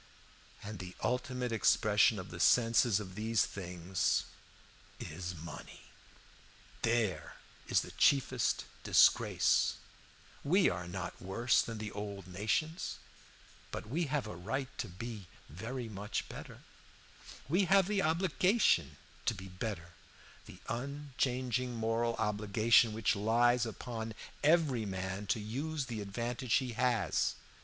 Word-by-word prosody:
"And 105 -1 -7
the 90 0 -8
ultimate 125 -1 -1
expression 110 -1 +4
of 95 0 -7
the 85 - -7
senses 115 +1 +4
of 95 -3 -7
these 110 +2 +1
things 90 -1 -1 0.8
is 90 +2 -5
money. 80 0 -9 1.0
There 115 -5 0 0.3
is - - +3
the - - -8
chiefest 130 -6 +2 0.2
disgrace. - - +4 0.7
We 180 +7 +4
are 85 0 -5
not 90 0 -6
worse 105 +6 +2
than 115 -1 -5
the 105 0 -5
old 100 -2 -6
nations, 110 - -2 0.7
but - - -6
we 165 +7 0
have 145 -3 -1
a 105 - -6
right 125 +9 -4
to - - -2
be 100 +2 -7 0.2
very 115 - -5
much 105 -1 -4
better; - - -10 0.9
we 180 +7 +3
have 195 0 +4
the 205 -1 +1
obligation 180 - +2 0.3
to - - +2
be 95 +1 -9
better, 90 -2 -5 0.6
the - - -11
unchanging 130 -2 -2
moral 115 +1 0
obligation 110 +2 +3
which 110 0 +1
lies 120 +3 +3
upon 115 -1 -5 0.3
every 150 -6 +3
man 95 0 -4
to 95 - +1
use 140 +8 -3
the 115 -4 -5
advantage 120 +4 -2
he 130 -3 +1
has. 115 - +1
115 Hz, 125 wpm, -33 LUFS, 100-125 Hz, 1.0 s, expression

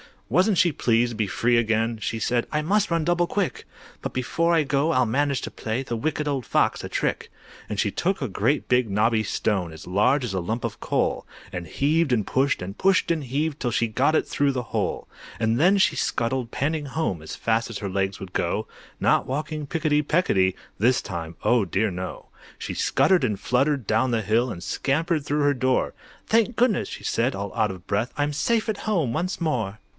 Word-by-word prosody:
Wasn't 185 - +3
she 175 - +4
pleased 120 -3 +2
to - - -6
be 110 -1 0
free 120 +5 +2
again! 115 0 +1
She 115 - -2
said, 120 +1 0
"I 150 - +1
must 200 +6 +1
run 165 -1 +1
double 175 +1 +2
quick; 200 -1 -2 0.4
But - - -4
before 165 +7 +1
I 160 - +3
go 145 +3 +1
I'll 130 -3 +3
manage 140 +4 0
to - - -5
play, 115 +4 -3
The 120 -3 -3
Wicked 150 +4 -1
Old 140 -3 -1
Fox - - +1
a - - -6
trick." - - -2 0.4
And 105 - -3
she 105 - +1
took 190 - 0
a 130 - -2
great 120 +9 0
big 125 -2 +3
knobby 110 +2 +2
stone, 95 -4 -1
As 80 - -11
large 105 +10 +2
as 115 -5 -3
a 95 - 0
lump 110 +7 -3
of 115 -3 -4
coal, - - -1 0.2
And 85 -1 -5
heaved 150 0 +1
and 110 -4 +1
pushed, 135 -3 +1
and 95 +3 -6
pushed 190 -2 +3
and 160 -4 -1
heaved, 145 +4 -1
'Till 120 - -1
she 115 0 +1
got 135 +8 +2
it - - +2
through 140 -1 +1
the 125 -1 -2
hole. - - -2 0.3
And 115 +1 +1
then 185 +6 +5
she 190 - +3
scuttled 120 0 -1
panting 150 +4 -1
home 140 - -2
As 80 - -7
fast 115 0 0
as 115 - -5
her 100 - -4
legs 95 +1 -1
would 95 -1 -8
go, - - -1 0.3
Not - - +3
walking 150 +2 -3
picketty 155 -2 +1
pecketty 120 - +2 0.2
This 125 +5 +3
time, 85 -3 -6
oh 120 -4 +3
dear 105 +3 0
no! 90 +1 -6 0.3
She - - -5
scuttered 185 -8 +3
and 105 -5 -1
fluttered 135 +2 +1
down 110 +6 +2
the 115 -2 0
hill, 115 +5 +2
And 90 -6 -6
scampered 155 - 0
through 150 +1 0
her 145 0 +3
door. 130 -1 +1 0.3
"Thank 230 +1 +2
goodness!" 235 -5 +2
she - - -8
said, 125 +3 0
all 100 0 -5
out 110 -2 +1
of 95 -2 -8
breath, 105 +5 -1
"I'm 145 0 +1
safe 220 +10 +1
at 215 - -1
home 170 - +1
once 175 +8 -2
more!" 115 -11 -1
125 Hz, 210 wpm, -24 LUFS, 110-155 Hz, 0.4 s, then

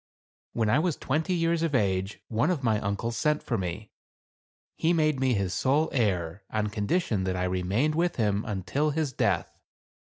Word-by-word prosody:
When 115 -2 +1
I 105 - +4
was 165 -2 +1
twenty 160 +6 -1
years 165 -1 +1
of 165 -4 0
age 95 -2 0
one 115 +8 +1
of 165 -7 -1
my 110 -3 +2
uncles 100 +4 -2
sent 150 +3 +1
for 120 - -1
me. 95 +2 -4 0.8
He 165 +2 +2
made 155 -4 +2
me 130 -2 +2
his 95 -3 -1
sole 145 +4 +2
heir, 95 -7 0
on 105 -1 -1
condition 105 - 0
that 95 -1 -1
I 90 - -1
remained 95 +11 0
with 175 +2 +1
him 105 -2 +1
until 110 - -1
his 150 -2 -1
death. - - 0
115 Hz, 175 wpm, -27 LUFS, 100-155 Hz, 0.8 s, I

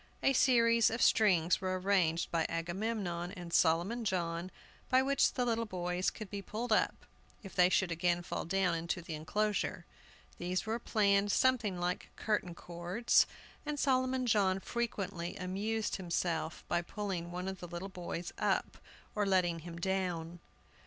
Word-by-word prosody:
A 270 - +4
series 230 -3 +5
of 230 - -3
strings 180 -8 +4
were 185 0 -1
arranged 180 -4 +1
by 165 -1 +1
Agamemnon 175 +1 -2
and 175 -2 -8
Solomon 175 +9 +2
John, 175 -3 -1 0.4
by 260 0 +5
which 275 +1 +3
the 250 - 0
little 230 -1 0
boys 180 -1 -1
could 215 - -8
be 200 -1 -4
pulled 225 +4 -5
up, - - +1 0.4
if 195 - -9
they 180 -1 +5
should 185 -1 +2
again 175 +1 +1
fall - - -3
down 185 0 +1
into 170 +1 -2
the 165 - -6
enclosure. 205 +7 -1 0.5
These 180 +2 -1
were 225 +2 -1
planned 205 -3 +2
something 225 -8 +2
like 175 +1 -2
curtain 205 -5 -1
cords, 175 +7 +1 0.4
and 300 0 -3
Solomon 255 -1 +2
John 200 -5 +3
frequently 195 -6 -3
amused 210 +4 -2
himself 170 -3 -2
by 175 - +1
pulling 180 -2 -4
one 180 +1 -4
of 190 -1 -4
the 175 - -7
little 175 +2 -5
boys 175 -2 -6
up - - 0 0.3
or 205 -1 0
letting 180 -3 +2
him 170 +1 -8
down. 175 -2 -2
185 Hz, 155 wpm, -33 LUFS, 175-215 Hz, 0.5 s, series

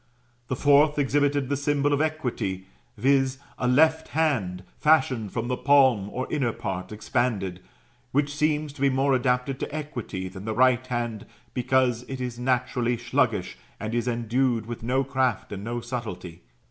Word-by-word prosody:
The 130 - -1
fourth 145 +2 +4
exhibited 145 -1 +1
the 140 - 0
symbol 145 0 +1
of 145 - +2
Equity, 120 -12 -2 0.3
viz. 135 +2 +2 0.2
a 125 - 0
left 160 +5 +4
hand, 110 - 0 0.2
fashioned 130 -8 +3
with 120 0 -1
the 125 - 0
palm 130 -7 +4
or 130 +4 -3
inner 135 -6 +1
part 95 0 -5
expanded; 105 -4 -1 0.5
which 145 +1 0
seems 150 -1 0
to 145 - -12
be 140 - +4
more 135 +1 +2
adapted 125 +1 0
to - - -4
Equity 130 -11 -5
than 95 +2 -9
the 110 -1 -2
right 130 +1 +3
hand, 120 -3 -3 0.3
because 125 -1 +2
it 135 -1 -5
is 125 -2 -4
naturally 125 -1 0
sluggish, - - 0 0.2
and 110 +1 -4
is 120 0 0
endued 120 0 0
with 120 +1 -6
no 130 +4 +1
craft 130 -5 -1
and 100 -1 -5
no 120 +2 -3
subtility. 95 -9 -6
125 Hz, 160 wpm, -26 LUFS, 115-140 Hz, 0.5 s, fourth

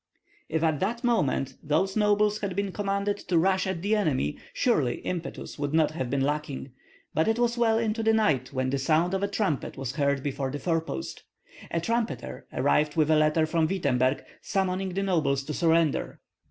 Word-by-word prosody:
If 160 0 0
at 155 -3 +2
that 230 +6 -2
moment 140 - +1
those 190 +6 0
nobles 210 0 +3
had 195 -3 -3
been 200 0 -1
commanded 200 +1 -1
to 175 -1 0
rush 190 +2 +2
at 185 -2 -3
the 210 +2 +2
enemy, 140 - 0
surely 150 - +1
impetus 170 -4 -5
would 145 +1 -1
not 155 -2 +3
have 130 -6 -3
been 140 +1 0
lacking; 145 -1 -2 0.4
but 160 - +2
it 225 +1 +2
was 240 -1 +1
well 230 -2 +3
into 225 0 0
the 225 0 +3
night 155 - +2
when 130 -1 -1
the 140 - 0
sound 160 +6 +2
of 195 - 0
a 200 - +1
trumpet 200 -8 -2
was 135 0 -4
heard 140 -2 +1
before 140 -1 -2
the 145 - -4
forepost. 160 - -3 0.5
A 170 - -1
trumpeter 230 +7 -3
arrived 150 -1 +1
with 155 -1 +3
a - - +6
letter 155 +1 +3
from 160 0 +1
Wittemberg 140 -7 +1 0.2
summoning 190 -1 -1
the 195 - 0
nobles 150 -8 +1
to 150 - -5
surrender. 165 -2 +1
165 Hz, 190 wpm, -27 LUFS, 145-200 Hz, 0.5 s, a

